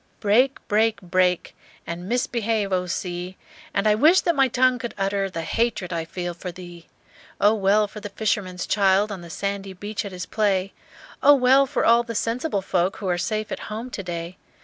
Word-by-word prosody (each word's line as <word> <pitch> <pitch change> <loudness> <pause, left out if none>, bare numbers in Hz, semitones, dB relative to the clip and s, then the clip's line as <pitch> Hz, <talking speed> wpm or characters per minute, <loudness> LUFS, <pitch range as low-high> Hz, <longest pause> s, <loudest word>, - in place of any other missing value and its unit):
"Break, 245 +6 +3
break, 220 +1 +2
break 180 0 +1 0.3
And 175 +3 -6
mis 245 +1 +1
behave, 220 -4 -1
O 180 0 0
sea, 180 +1 -4 0.3
And 200 - -1
I 210 - +5
wish 310 - +5
that 340 - +1
my 270 -1 +4
tongue 255 0 +2
could 240 -2 -6
utter 195 0 0
The 165 -3 -5
hatred 210 -1 -1
I 165 -1 -2
feel 175 +1 -5
for 180 +1 -7
thee! 175 -1 -12 0.5
"Oh, 205 +1 +5
well 210 0 +3
for 210 - -10
the 205 0 -7
fisherman's 195 -3 -2
child 200 +1 +2
On 190 -3 -6
the 170 - -11
sandy 200 +2 -4
beach 205 +3 -5
at 200 - -7
his 180 -1 -6
play; 195 -3 0 0.5
Oh, 290 +1 +7
well 265 +1 +4
for 275 -2 -1
all 235 +1 +5
sensible 230 -1 -1
folk 180 0 0
Who 200 - -5
are 175 0 0
safe 215 +3 -2
at - - -3
home 225 +4 -5
to 200 - -5
day! 175 -1 -6
200 Hz, 195 wpm, -23 LUFS, 180-225 Hz, 0.5 s, Oh